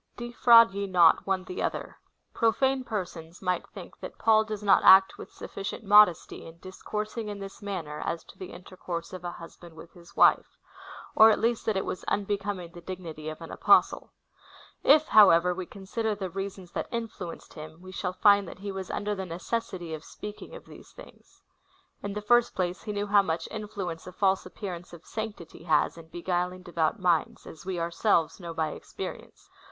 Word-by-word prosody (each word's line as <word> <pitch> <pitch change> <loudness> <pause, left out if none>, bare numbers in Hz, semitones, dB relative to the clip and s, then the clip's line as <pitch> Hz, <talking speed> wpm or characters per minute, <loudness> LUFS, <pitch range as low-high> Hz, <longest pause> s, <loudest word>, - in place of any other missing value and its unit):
5. 240 - -5
Defi^QAid 230 -3 +6
ye 200 0 -3
not 175 -2 +4
one 190 -1 0
the 185 - -6
other. - - -4 0.3
Profane 265 +3 +1
persons 175 -7 -6
might 180 -1 -2
think - - -12
that - - -9
Paul 220 -1 +4
does 215 -1 -6
not 200 -1 +4
act 190 0 +7
with - - -10
sufficient 195 +3 -7
modesty 205 -4 +4
in 165 0 -13
dis 185 +2 -12
coursing 215 +1 -4
in 205 - -5
this 195 +1 -9
manner 175 -7 -5
as 165 -1 -3
to - - -16
the 185 - -8
intercourse 175 -1 -7
of 185 -1 -8
a 175 -1 -4
husband 170 0 -12
with 165 +1 -13
his 170 -1 -17
wife; - - +4 0.6
or 220 0 +8
at 215 - +3
least 230 0 0
that 215 -3 +1
it 190 - -1
was - - -5
unbecoming 200 -3 -2
the 175 - -12
dignity 165 -4 -7
of 155 +1 -9
an 165 - -9
Apostle. - - +3 0.7
If, 310 +2 +5
however, 180 -4 +6
we 180 -1 -6
consider 210 +2 -3
the 190 -3 -5
reasons 195 -1 -6
that - - -4
influenced 220 -7 -6
him, 155 +1 -10
we 185 +1 -11
shall 185 -1 -3
find 200 +1 +4
that - - -9
he 200 +1 -6
was 190 -1 -6
under 210 0 -2
the 190 -2 -5
necessity 175 -1 -4
of 155 0 -6
speaking 210 - -9
of - - -11
these - - -14
things. - - -16 0.6
In 205 0 -4
the 210 0 -5
first 240 +2 +3
place, 180 -1 -2
he 210 - -5
knew 205 0 -2
how 205 0 +5
much 165 -3 -3
influence 195 -6 -6
a - - -7
false 190 0 +1
appearance 180 -3 -8
of 165 -2 -12
sanctity 210 -7 -7
has 155 -3 +2
in 165 -1 -13
beguil 175 +1 -2
ing 185 - -14
devout 170 +1 -1
minds, 175 -3 0
as 160 - -12
Ave 185 -2 -2
ourselves 170 +1 +1
know 170 -2 -7
by 160 -1 0
experience. - - -9
190 Hz, 195 wpm, -27 LUFS, 170-210 Hz, 0.7 s, or